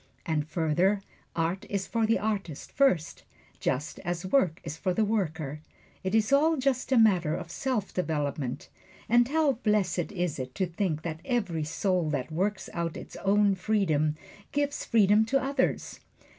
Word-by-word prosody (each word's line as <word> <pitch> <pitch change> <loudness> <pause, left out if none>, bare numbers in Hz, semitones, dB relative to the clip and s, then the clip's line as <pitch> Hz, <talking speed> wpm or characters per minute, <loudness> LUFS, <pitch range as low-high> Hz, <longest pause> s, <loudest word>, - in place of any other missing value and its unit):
And 155 -2 -1
further, 175 +5 +1 0.3
art 170 +4 -1
is 200 -1 -1
for 225 -1 0
the 225 - +3
artist 200 -8 -3
first, 185 - +2 0.4
just 140 +5 -2
as 175 +1 -3
work 185 - +2
is 150 - -5
for 180 +2 -1
the 220 - +3
worker 160 -8 -2 0.4
it 190 +3 0
is 220 +3 +2
all 315 +3 +4
just 265 -1 0
a 260 - +5
matter 185 -8 +4
of 170 - -6
self 250 -2 -2
development. 145 -6 -2 0.4
And 240 +1 +4
how 305 0 +3
blessed 190 -5 +1
is 175 -6 -2
it 130 0 -6
to 190 - +1
think 170 -3 -2
that 160 -1 -4
every 200 - -1
soul 180 0 0
that 145 0 -2
works 195 +5 -1
out 170 -1 -2
its - - -10
own 200 0 +3
freedom 180 -7 +1 0.4
gives 290 0 -1
freedom 210 -1 +5
to 275 +4 +2
others! 270 0 -1
190 Hz, 160 wpm, -28 LUFS, 160-220 Hz, 0.4 s, a